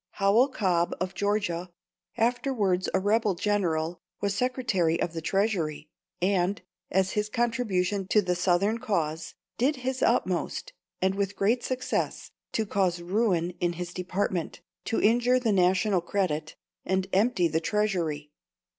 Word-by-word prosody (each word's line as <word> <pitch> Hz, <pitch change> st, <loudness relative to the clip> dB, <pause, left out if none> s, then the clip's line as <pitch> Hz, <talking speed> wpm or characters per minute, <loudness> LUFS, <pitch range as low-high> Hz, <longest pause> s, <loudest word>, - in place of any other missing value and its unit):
Howell 205 Hz, +6 st, +4 dB
Cobb 180 Hz, -9 st, 0 dB
of 185 Hz, +1 st, -2 dB
Georgia, 200 Hz, -4 st, -1 dB, 0.5 s
afterwards 225 Hz, -6 st, +1 dB
a -, -, +2 dB
rebel 210 Hz, 0 st, +2 dB
general, 170 Hz, -4 st, 0 dB, 0.2 s
was 200 Hz, 0 st, 0 dB
Secretary 215 Hz, -10 st, 0 dB
of 165 Hz, -, -1 dB
the 165 Hz, -, -4 dB
Treasury, 165 Hz, -5 st, -1 dB, 0.3 s
and, 185 Hz, 0 st, +1 dB, 0.3 s
as 190 Hz, 0 st, +1 dB
his 210 Hz, 0 st, -1 dB
contribution 210 Hz, -5 st, 0 dB
to 210 Hz, +1 st, +3 dB
the 180 Hz, -1 st, +1 dB
Southern 185 Hz, +5 st, +1 dB
cause, 165 Hz, -9 st, -2 dB, 0.2 s
did 275 Hz, +5 st, +3 dB
his 260 Hz, 0 st, -3 dB
utmost, -, -, 0 dB, 0.3 s
and 190 Hz, 0 st, +3 dB
with 200 Hz, 0 st, -2 dB
great 230 Hz, +5 st, +1 dB
success, 255 Hz, 0 st, -2 dB, 0.2 s
to 220 Hz, -, 0 dB
cause 190 Hz, -4 st, 0 dB
ruin 180 Hz, -1 st, +1 dB
in 175 Hz, -1 st, +1 dB
his 175 Hz, +1 st, -6 dB
department, 180 Hz, -1 st, -2 dB, 0.3 s
to 225 Hz, -, 0 dB
injure 245 Hz, +3 st, +4 dB
the 230 Hz, -4 st, +1 dB
national 185 Hz, +1 st, +3 dB
credit, 165 Hz, -5 st, -2 dB, 0.3 s
and 190 Hz, 0 st, 0 dB
empty 195 Hz, -2 st, +3 dB
the 160 Hz, 0 st, 0 dB
treasury. 170 Hz, -7 st, -1 dB
195 Hz, 135 wpm, -27 LUFS, 175-215 Hz, 0.5 s, Howell